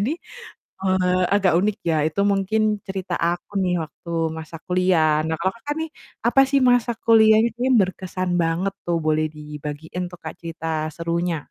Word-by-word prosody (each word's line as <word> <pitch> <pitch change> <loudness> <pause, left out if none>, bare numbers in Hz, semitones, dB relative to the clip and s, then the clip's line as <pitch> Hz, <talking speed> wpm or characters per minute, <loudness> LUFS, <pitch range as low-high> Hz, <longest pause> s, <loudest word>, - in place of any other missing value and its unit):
Jadi, 225 +8 0 0.7
eee, 185 -1 +2
agak 195 -3 +3
unik. 205 +1 0
Ya 160 - +2
itu 160 +5 -3
mungkin 195 +3 0 0.3
cerita 190 -2 -4
aku 170 +1 -1
nih 180 -1 +1
waktu 165 +2 -13 0.3
masa 160 +1 -8
kuliah, 180 -4 +3
nah 160 - -1
kalo 190 +2 +1
Kakak 290 +5 -4
nih, 320 - -5 0.4
apa 240 +3 +5
sih 280 0 +3
masa 245 -1 +3
kuliahnya 220 0 +6
ini 255 +2 +1
berkesan 185 -1 -2
banget 165 +4 0 0.2
tuh? 170 -1 +1
Boleh 155 0 +2
dibagiin 150 +3 -6
tuh 175 - -11
Kak - - -6
cerita 165 -1 -7 0.3
serunya? 170 +1 -1
180 Hz, 160 wpm, -22 LUFS, 165-200 Hz, 0.7 s, kuliahnya